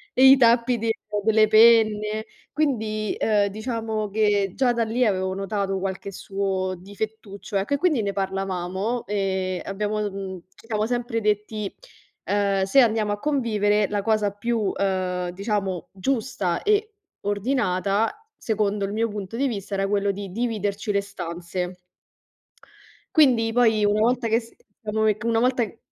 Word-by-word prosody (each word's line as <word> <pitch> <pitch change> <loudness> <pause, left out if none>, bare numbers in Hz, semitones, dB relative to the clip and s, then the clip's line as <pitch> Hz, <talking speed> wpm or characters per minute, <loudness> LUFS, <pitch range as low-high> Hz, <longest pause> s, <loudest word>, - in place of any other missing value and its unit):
i 265 +1 +8
tappi 235 0 +4
di 225 0 0 0.3
delle 220 0 +4
penne. 215 -1 +4 0.3
Quindi, 220 -8 -1
uhm, 205 -2 +2
diciamo 220 0 -3
che 205 -2 +1
già 255 -2 +2
da 235 -1 +1
lì 240 +3 +1
avevo 190 -2 0
notato 195 0 -2
qualche 195 +1 -4
suo 190 -1 -2
difettuccio, 205 +1 -6
ecco, 200 +9 -1
e - - -1
quindi 300 -7 +2
ne 200 -1 -2
parlavamo 195 +3 -2
e 190 -2 -1
abbiamo, 210 +2 -2
uhm, 195 -3 -4
ci 225 - -19
siamo 215 -2 0
sempre 240 -1 -2
detti: 210 -1 -1 0.5
“Uhm, 200 -1 +1
se 195 +8 +4
andiamo 220 -3 +2
a 205 - -2
convivere, 210 -8 +1
la 205 -1 -1
cosa 210 -1 +1
più, 215 0 -1
uhm, 185 -2 -1
diciamo, 195 -2 -3
giusta 200 -4 -2
e 425 +1 +1 0.3
ordinata, 205 - 0
secondo 210 -2 -1
il 200 - -4
mio 225 +1 0
punto 205 +1 -6
di 275 +1 +1
vista, 200 -4 -5
era 195 0 0
quello 200 0 +1
di 195 -1 -7
dividerci 210 -2 -2
le 200 0 +1
stanze.” 180 0 -5 1.4
Quindi, 245 -8 +4
poi, 220 -3 +3
una 205 +1 +2
volta 240 +1 +2
che 225 +1 +3
s 230 - -15 0.3
diciamo 220 0 -1
che 215 +1 +1
una 230 -1 +2
volta 250 -1 +2
che 225 - -11
210 Hz, 150 wpm, -24 LUFS, 195-230 Hz, 1.4 s, i